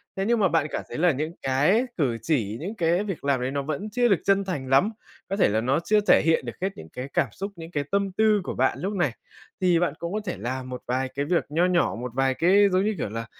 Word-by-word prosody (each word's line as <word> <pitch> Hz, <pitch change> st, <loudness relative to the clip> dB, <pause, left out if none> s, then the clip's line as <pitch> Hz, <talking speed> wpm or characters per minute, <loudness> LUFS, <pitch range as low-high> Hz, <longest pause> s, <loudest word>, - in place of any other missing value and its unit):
Thế 195 Hz, -, -1 dB
nhưng 235 Hz, +1 st, +2 dB
mà 195 Hz, -, +4 dB
bạn 165 Hz, -4 st, +1 dB
cảm -, -, -3 dB
thấy -, -, -6 dB
là 175 Hz, +2 st, +4 dB
những 155 Hz, +3 st, -3 dB
cái 150 Hz, -, +2 dB
cử 130 Hz, -8 st, +1 dB
chỉ, 115 Hz, -9 st, -1 dB
những 190 Hz, +9 st, -5 dB
cái 175 Hz, 0 st, +1 dB
việc 195 Hz, -8 st, -5 dB
làm 140 Hz, -2 st, +1 dB
ấy 125 Hz, +1 st, -2 dB
nó 140 Hz, 0 st, -1 dB
vẫn 155 Hz, +9 st, -4 dB
chưa 245 Hz, +3 st, +2 dB
được 195 Hz, -6 st, +3 dB
chân 200 Hz, 0 st, +3 dB
thành 145 Hz, -9 st, -4 dB
lắm, 135 Hz, +10 st, +4 dB, 0.4 s
có 195 Hz, -, -1 dB
thể 200 Hz, -, +3 dB
là 110 Hz, +2 st, +1 dB
nó 130 Hz, +5 st, +1 dB
chưa 215 Hz, +3 st, +3 dB
thể -, -, +6 dB
hiện 160 Hz, -5 st, +2 dB
được 120 Hz, -, -5 dB
hết 190 Hz, -, +1 dB
những 80 Hz, -, -10 dB
cái 125 Hz, +10 st, -6 dB
cảm -, -, +2 dB
xúc, 195 Hz, +1 st, -6 dB
những 165 Hz, -1 st, -10 dB
cái 145 Hz, -4 st, -1 dB
tâm 200 Hz, -1 st, +1 dB
tư 215 Hz, +1 st, +3 dB
của -, -, -4 dB
bạn 130 Hz, +1 st, +1 dB
lúc 195 Hz, +4 st, -2 dB
này, 175 Hz, -9 st, +1 dB, 0.5 s
thì 180 Hz, -2 st, +3 dB
bạn 175 Hz, -4 st, 0 dB
cũng 170 Hz, +2 st, -4 dB
có 215 Hz, -, 0 dB
thể 175 Hz, -, -3 dB
làm 130 Hz, +1 st, -4 dB
một 125 Hz, -1 st, -6 dB
vài 130 Hz, +2 st, 0 dB
cái 140 Hz, +1 st, -1 dB
việc 170 Hz, +2 st, +1 dB
nho 165 Hz, +4 st, +2 dB
nhỏ, 180 Hz, -1 st, +2 dB
một 125 Hz, 0 st, -5 dB
vài 135 Hz, 0 st, +2 dB
cái, 195 Hz, +7 st, +4 dB
giống 185 Hz, +1 st, +2 dB
như 215 Hz, 0 st, 0 dB
kiểu -, -, -3 dB
là, 115 Hz, +2 st, -5 dB
165 Hz, 280 wpm, -25 LUFS, 130-195 Hz, 0.5 s, thể